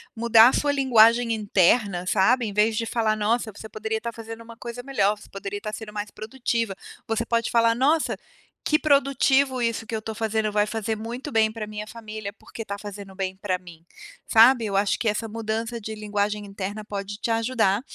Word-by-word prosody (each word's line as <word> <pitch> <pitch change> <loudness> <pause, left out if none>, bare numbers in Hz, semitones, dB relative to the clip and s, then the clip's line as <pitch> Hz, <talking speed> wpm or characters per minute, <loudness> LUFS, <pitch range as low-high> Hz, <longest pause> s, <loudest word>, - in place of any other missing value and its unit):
mudar 230 +1 +7
a - - -2
sua 290 -1 +1
linguagem 235 -3 +4
interna, 200 -2 +2
sabe, 225 +6 +3
em 205 - -4
vez 215 +2 +2
de 230 - -1
falar: 225 -2 0
"Nossa, 220 +2 0
você 215 +2 -10
poderia 220 +1 -3
estar 235 +1 -4
fazendo 225 0 -9
uma 230 0 -12
coisa 240 +1 -7
melhor. 210 -6 +1
Você - - -15
poderia 200 +1 -6
estar 215 +1 -6
sendo 215 -1 -7
mais 210 0 -5
produtiva". 230 -2 -3 0.3
Você 225 +1 -1
pode 230 -1 0
falar 230 -1 +4
:"Nossa, 295 +6 +2 0.5
que 305 +1 +3
produtivo 275 -2 +3
isso 230 -1 -1
que 225 - -8
eu 220 - 0
estou 220 0 -6
fazendo, 220 -1 0
vai 210 0 +2
fazer 220 0 -2
muito 240 +6 -6
bem 220 -1 +3
para 220 -1 -5
a - - -14
minha 210 0 -6
família, 215 -2 -7
porque 225 - -11
está 200 -2 -5
fazendo 200 -1 -9
bem 190 -1 -3
pra 190 -1 -2
mim", 170 -2 -15 0.4
sabe? 230 +1 +6
Eu 200 -2 -1
acho 200 0 +2
que 225 - 0
essa 210 +2 -2
mudança 225 +1 -3
de 220 +1 -5
linguagem 210 0 -2
interna 200 +2 -6
pode 205 0 -5
te 230 - -3
ajudar 225 -3 +1
220 Hz, 205 wpm, -24 LUFS, 210-235 Hz, 0.5 s, mudar